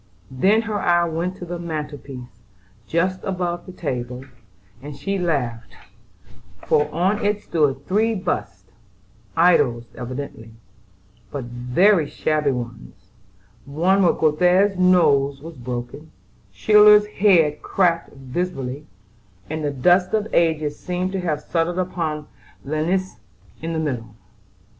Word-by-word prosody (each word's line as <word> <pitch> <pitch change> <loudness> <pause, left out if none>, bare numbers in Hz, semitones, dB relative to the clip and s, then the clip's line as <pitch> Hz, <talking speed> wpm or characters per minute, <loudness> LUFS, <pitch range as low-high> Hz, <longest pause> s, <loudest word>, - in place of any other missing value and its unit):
Then 195 - +3
her 215 -2 -2
eye 175 -2 +3
went 170 +2 -2
to 180 - -8
the 175 0 -5
mantel 155 -4 -5
piece, 125 -4 -11 0.5
just 185 +3 0
above 180 -2 -3
the - - -7
table, 125 -7 -5 0.6
and 145 +1 -8
she 195 0 -2
laughed; 125 -10 -2 0.9
for, 150 - +2
on 190 +5 0
it 205 0 0
stood 140 -4 0
three 220 +4 +1
busts, 160 - -3 0.7
idols 145 -9 +4
evidently, 125 -3 -7 0.8
but 140 +3 -5
very 135 +9 +2
shabby 150 -2 0
ones; 120 - -5 0.7
for 165 +7 +1 0.2
Göthe's 180 +6 +3
nose 145 -7 +3
was 165 +4 -9
broken, 125 +4 -6 0.4
Schiller's 210 - +6
head 180 -8 +3
cracked 170 -3 +1
visibly, 135 0 -4 0.6
and 155 0 -3
the 145 - 0
dust 180 +8 +3
of 215 0 -1
ages 155 -3 +1
seemed 180 +1 -3
to 190 - -2
have 155 -4 -2
settled 170 +1 -1
upon 165 -5 -2 0.4
Linnæus 160 +2 -1 0.4
in 165 +1 -3
the - - -2
middle. 125 -9 -3
160 Hz, 120 wpm, -22 LUFS, 135-185 Hz, 0.9 s, Schiller's